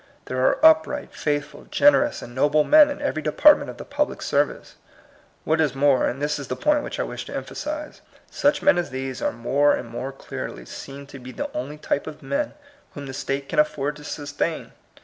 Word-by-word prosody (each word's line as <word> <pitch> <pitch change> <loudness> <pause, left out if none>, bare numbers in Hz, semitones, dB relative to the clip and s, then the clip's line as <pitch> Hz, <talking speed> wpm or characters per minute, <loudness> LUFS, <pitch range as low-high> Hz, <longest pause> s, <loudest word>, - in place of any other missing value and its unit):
There 130 0 -2
are - - +3
upright, 160 0 +4
faithful, 145 0 -3
generous, 290 0 +3
and 120 - -10
noble 145 +4 +3
men 300 - +7
in 290 0 -5
every 220 - -1
department 290 - +5
of - - -8
the - - -8
pub - - 0
lic - - -8
service. - - -1 0.7
What 160 +1 +1
is 145 -4 +1
more 135 -1 +3
(and 130 - -3
this 145 0 -1
is 140 - -7
the 130 - -3
point 295 - +2
which - - -6
I - - +1
wish - - -6
to - - -8
emphasize), 300 0 -5 0.3
such 290 +1 +1
men 290 -11 +5
as 175 - -3
these 130 0 -5
are - - +1
more 130 +5 +2
and 120 - -6
more 125 +3 -5
clearly 135 - -7
seen 140 +1 -9
to 140 -1 -11
be 125 0 -9
the - - -5
only 140 +5 -5
type 145 - -2
of 155 -1 -9
men 285 +1 -2 0.4
whom 145 - -7
the 135 - -7
state 135 +1 -3
can - - -1
afford 150 -1 +1
to 150 - -12
sustain. 145 +2 -4
145 Hz, 210 wpm, -23 LUFS, 135-170 Hz, 0.7 s, men